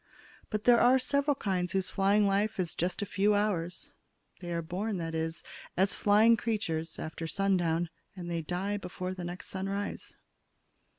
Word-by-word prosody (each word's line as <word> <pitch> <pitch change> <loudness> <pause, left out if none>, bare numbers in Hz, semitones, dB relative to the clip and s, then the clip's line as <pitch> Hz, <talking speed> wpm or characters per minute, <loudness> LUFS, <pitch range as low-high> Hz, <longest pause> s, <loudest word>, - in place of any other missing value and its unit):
But 215 0 -2
there 240 -1 +6
are 250 +2 +6
several 280 +2 +1
kinds 185 -6 -1
whose 190 -1 0
flying 200 +1 +3
life 200 +1 +1
is 175 -3 -1
just 180 +5 -1
a - - -2
few 205 +1 +2
hours; 185 -4 -1 0.5
they 175 -1 -6
are 170 -1 -1
born, 190 +6 -2
that 165 -1 -4
is, 160 0 -2 0.3
as 190 +2 +3
flying 215 +3 +5
creatures, 165 -9 -2
after 160 +1 -5
sundown 175 -3 +1 0.3
and 180 -2 -7
they 170 -1 -2
die 185 +5 -2
before 185 -1 -5
the 185 -1 -6
next 175 +1 -6
sunrise. 195 +1 -4
190 Hz, 165 wpm, -30 LUFS, 175-205 Hz, 0.5 s, there